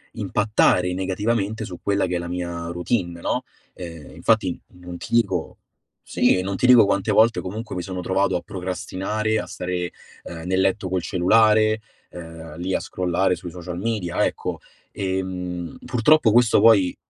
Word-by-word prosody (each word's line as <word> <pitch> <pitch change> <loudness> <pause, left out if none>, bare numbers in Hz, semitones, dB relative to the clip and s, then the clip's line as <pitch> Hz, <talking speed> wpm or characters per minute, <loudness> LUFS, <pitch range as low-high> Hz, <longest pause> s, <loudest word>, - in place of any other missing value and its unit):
impattare 90 -4 +2
negativamente 105 +3 -1
su 90 -3 -8
quella 100 -1 +1
che 90 0 -2
è - - 0
la 85 - -5
mia 85 -1 -4
routine, 85 -1 -2
no, - - -1 0.3
ehm, 85 -5 -9
infatti 110 -6 +1
non 90 -1 -9
ti - - -9
dico 100 -8 +1 0.5
sì, 90 - +2
non 95 +1 -3
ti 125 - 0
dico 125 -4 +8
quante 100 -1 0
volte 115 +1 +4
comunque 105 +3 -6
mi 90 - -2
sono 90 0 -5
trovato 95 +1 +1
a 90 - -1
procrastinare, 95 +4 -3
a - - -4
stare, 90 -1 -4 0.3
ehm, 85 -1 -8
nel 95 +1 +1
letto 95 0 +1
col 90 -1 0
cellulare, 110 +4 +3 0.3
ehm, 80 -2 -10
lì 90 +2 -2
a - - +1
scrollare 90 +1 0
sui 90 -2 -8
social 90 -1 -7
media, 100 -5 -1
ecco, - - -3 0.3
ehm, 90 -2 -4
purtroppo 125 0 +4
questo 120 -3 +5
poi 100 -5 +5
95 Hz, 160 wpm, -23 LUFS, 90-105 Hz, 0.5 s, dico